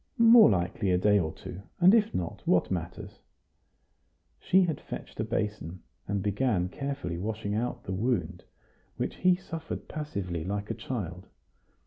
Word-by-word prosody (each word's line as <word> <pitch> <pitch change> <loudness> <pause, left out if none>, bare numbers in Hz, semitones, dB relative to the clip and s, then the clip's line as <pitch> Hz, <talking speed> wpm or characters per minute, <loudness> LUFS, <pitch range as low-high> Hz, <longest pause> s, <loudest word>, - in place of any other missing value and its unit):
"More 230 -1 +8
likely 95 0 0
a 90 - +3
day 105 +2 +4
or 80 -4 -1
two; 90 - -9 0.2
and 180 +3 +7
if 220 -1 +4
not, 85 -2 -4
what - - +3
matters?" - - -5 1.2
She 190 +1 +4
had 160 -5 -2
fetched - - -8
a - - +1
basin, 100 -4 -3 0.2
and 100 -1 -1
began 105 -3 +1
carefully 140 -9 -4
washing 105 +1 -3
out 120 +3 -2
the - - -5
wound, 95 -5 -1 0.5
which - - -3
he 185 0 +4
suffered 165 -3 -7
passively, 100 - -4
like 100 +3 -3
a - - 0
child. 90 -7 -5
105 Hz, 150 wpm, -29 LUFS, 90-145 Hz, 1.2 s, More